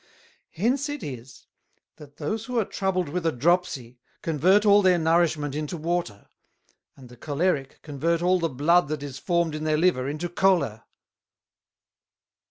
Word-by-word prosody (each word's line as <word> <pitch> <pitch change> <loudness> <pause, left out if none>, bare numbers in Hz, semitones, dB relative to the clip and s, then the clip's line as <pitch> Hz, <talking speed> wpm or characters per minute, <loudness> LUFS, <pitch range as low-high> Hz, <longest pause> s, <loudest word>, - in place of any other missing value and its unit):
Hence 255 - -1
it 290 0 -5
is, 125 -2 -9 0.5
that 145 -1 -15
those 215 +9 -3
who 250 0 -4
are 225 - +2
troubled 185 -3 -1
with 175 +3 -3
a 165 - +1
Dropsie 140 -4 -1 0.2
convert 180 +7 +3
all 205 0 +6
their 185 -2 +4
nourishment 160 -3 +1
into 150 +3 -4
Water; 165 -10 -3 0.7
and 130 -2 -13
the 125 - -14
Cholerick 145 0 -2
convert 165 +3 -1
all 180 +1 +3
the 165 -1 0
Blood 155 +6 +2
that 150 -1 -4
is 135 -2 -7
formed 170 -2 0
in 155 0 -5
their 155 -1 +1
Liver 150 -6 +1
into 155 +4 -3
Choler. 170 - +1
165 Hz, 155 wpm, -25 LUFS, 145-180 Hz, 0.7 s, all